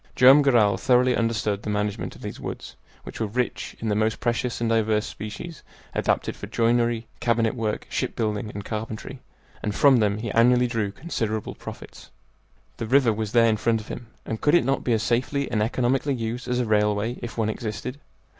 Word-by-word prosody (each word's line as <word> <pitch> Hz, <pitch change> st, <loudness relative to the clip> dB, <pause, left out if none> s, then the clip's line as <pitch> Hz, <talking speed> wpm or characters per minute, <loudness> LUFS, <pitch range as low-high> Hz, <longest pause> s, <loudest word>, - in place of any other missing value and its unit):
Joam 130 Hz, +3 st, +8 dB
Garral 115 Hz, -8 st, +4 dB
thoroughly 125 Hz, +4 st, +3 dB
understood 110 Hz, -3 st, 0 dB
the 105 Hz, -, -5 dB
management 105 Hz, 0 st, -2 dB
of -, -, -14 dB
these -, -, -6 dB
woods, -, -, -7 dB, 0.3 s
which -, -, -9 dB
were 110 Hz, -, 0 dB
rich 125 Hz, +4 st, -3 dB
in 115 Hz, -, -4 dB
the 105 Hz, -, +1 dB
most 110 Hz, +1 st, +1 dB
precious 120 Hz, 0 st, -1 dB
and 115 Hz, -, 0 dB
diverse 110 Hz, -1 st, +2 dB
species 110 Hz, +11 st, -7 dB, 0.3 s
adapted -, -, 0 dB
for -, -, -8 dB
joinery, 115 Hz, 0 st, +1 dB
cabinet 115 Hz, -2 st, +1 dB
work, 110 Hz, -3 st, -2 dB
ship -, -, -2 dB
building, 105 Hz, -1 st, -1 dB
and 100 Hz, 0 st, -7 dB
carpentry, 110 Hz, +4 st, -5 dB, 0.4 s
and 105 Hz, -1 st, -2 dB
from 140 Hz, -3 st, +6 dB
them 105 Hz, -2 st, +2 dB
he 110 Hz, 0 st, -4 dB
annually 125 Hz, +3 st, +4 dB
drew 115 Hz, -4 st, -1 dB
considerable 110 Hz, -5 st, -3 dB
profits. -, -, -10 dB, 0.7 s
The 115 Hz, -, -4 dB
river 130 Hz, -2 st, +4 dB
was 105 Hz, -1 st, -3 dB
there 115 Hz, -1 st, +6 dB
in 110 Hz, -1 st, +3 dB
front 115 Hz, +1 st, +1 dB
of 110 Hz, -, -11 dB
him, 120 Hz, -, -7 dB, 0.2 s
and 110 Hz, -, -4 dB
could 150 Hz, +3 st, +4 dB
it 175 Hz, -, +4 dB
not 135 Hz, +1 st, 0 dB
be 120 Hz, -, +1 dB
as 110 Hz, -1 st, +1 dB
safely 130 Hz, +4 st, 0 dB
and 110 Hz, -3 st, +1 dB
economically 130 Hz, +5 st, +1 dB
used 115 Hz, +1 st, -4 dB
as 125 Hz, 0 st, 0 dB
a 125 Hz, -, +1 dB
railway 105 Hz, +2 st, +1 dB
if 115 Hz, -2 st, -7 dB
one 110 Hz, -2 st, +1 dB
existed? 115 Hz, +5 st, -5 dB
115 Hz, 195 wpm, -25 LUFS, 110-125 Hz, 0.7 s, Joam